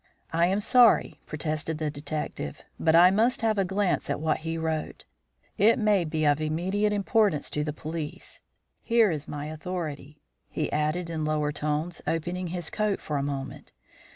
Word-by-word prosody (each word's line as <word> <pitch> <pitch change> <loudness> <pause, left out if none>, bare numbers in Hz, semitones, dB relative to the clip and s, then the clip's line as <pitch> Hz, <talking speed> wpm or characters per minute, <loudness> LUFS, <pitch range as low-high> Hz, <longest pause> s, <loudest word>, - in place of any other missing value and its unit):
"I 170 +1 +3
am 195 +3 +1
sorry," 240 +1 +4
protested 155 +1 -3
the 155 -1 -2
detective 145 - -5 0.2
"but 160 0 +3
I 175 +2 +8
must 225 +6 +2
have 220 -2 +1
a - - +4
glance 190 0 0
at - - -1
what 155 0 0
he 165 +1 -3
wrote. 160 -1 -3 0.5
It 220 +4 +5
may 210 -5 +2
be 155 0 -1
of 145 +1 +3
immediate 185 +7 0
importance 205 -5 +1
to 150 - -1
the 150 - -2
police. 155 0 -7 0.4
Here 230 -4 +3
is 150 -2 -4
my 145 0 -5
authority," 155 -2 -6 0.3
he - - -2
added 155 +3 -1
in 160 -1 -2
lower 150 -1 0
tones, 150 +3 -2
opening 175 +3 -2
his 175 -1 -5
coat 210 -2 0
for 150 - -3
a - - 0
moment. 140 -1 -5
160 Hz, 170 wpm, -27 LUFS, 150-190 Hz, 0.5 s, I